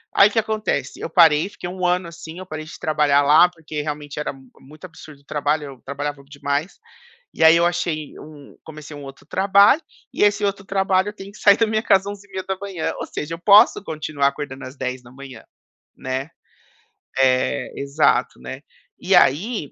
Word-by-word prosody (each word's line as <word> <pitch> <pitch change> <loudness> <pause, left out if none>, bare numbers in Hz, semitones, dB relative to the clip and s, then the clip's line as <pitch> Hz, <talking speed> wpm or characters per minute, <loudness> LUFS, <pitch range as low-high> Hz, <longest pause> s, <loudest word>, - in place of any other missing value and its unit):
Aí, 200 - +7
o - - -13
que 225 - +1
acontece? 215 - -2
Eu - - -4
parei, 165 +1 +4
fiquei 175 - -8
1 180 0 -4
ano 180 0 +1
assim, 165 +1 -10
eu 185 - -8
parei 155 -3 -7
de - - -11
trabalhar 150 -2 +2
lá 155 +5 +6
porque 160 -3 -7
realmente 145 -1 -6
era 150 - -3
mu 135 -2 -18
muito 155 +6 -14
absurdo 160 -4 -13
o - - -33
trabalho, 150 +1 -1
eu 135 -3 -11
trabalhava 140 0 -5
demais, 145 +4 -4 0.6
e - - +1
aí, 160 +1 +8
eu 170 - +3
achei 170 -4 -2
um 150 -2 -14
comecei 155 -1 -11
um 145 - -10
outro 135 0 -12
trabalho, 200 - +4 0.3
e - - +1
esse 205 0 +2
outro 200 0 -2
trabalho 195 0 +1
tem 200 -1 -11
que 210 - -15
sair 200 -1 +6
da 225 - +2
minha 220 +1 -1
casa 195 +1 +3
11h30, 195 -2 -5
ou - - -5
seja, 155 +3 -5
eu 165 - -14
posso 200 +1 +5
continuar 150 -4 -1
acordando 140 -1 -5
às 130 +2 -11
10h00, 130 0 -7 0.5
né, 130 +3 -4 0.9
eh, 130 0 +1
exato, 140 - +1
né. 65 - -8 0.4
E - - +2
aí, 175 - +2
155 Hz, 185 wpm, -21 LUFS, 140-190 Hz, 0.9 s, aí